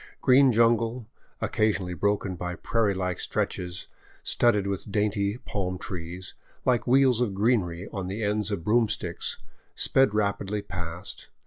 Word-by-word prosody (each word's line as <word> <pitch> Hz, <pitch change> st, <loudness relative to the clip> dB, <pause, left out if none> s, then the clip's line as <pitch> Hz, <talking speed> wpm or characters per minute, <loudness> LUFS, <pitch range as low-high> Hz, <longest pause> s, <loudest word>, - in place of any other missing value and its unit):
Green 130 Hz, +1 st, +6 dB
jungle, 115 Hz, +1 st, +2 dB, 0.4 s
occasionally 100 Hz, -4 st, 0 dB
broken 100 Hz, +1 st, 0 dB
by 90 Hz, 0 st, -4 dB
prairie 105 Hz, +1 st, 0 dB
like 90 Hz, -2 st, -2 dB
stretches 90 Hz, 0 st, -2 dB, 0.4 s
studded 105 Hz, -5 st, +3 dB
with 100 Hz, +1 st, -3 dB
dainty 105 Hz, 0 st, 0 dB
palm 95 Hz, -6 st, -3 dB
trees, 90 Hz, 0 st, -6 dB, 0.3 s
like 125 Hz, -1 st, +2 dB
wheels 130 Hz, -1 st, +4 dB
of 105 Hz, -6 st, 0 dB
greenery 100 Hz, -5 st, +1 dB
on 95 Hz, -3 st, -3 dB
the 100 Hz, +4 st, -3 dB
ends 105 Hz, 0 st, 0 dB
of 100 Hz, -6 st, -3 dB
broomsticks, 105 Hz, -5 st, 0 dB, 0.4 s
sped 135 Hz, -6 st, +3 dB
rapidly 100 Hz, 0 st, 0 dB
past. 85 Hz, 0 st, -6 dB
100 Hz, 130 wpm, -27 LUFS, 90-115 Hz, 0.4 s, Green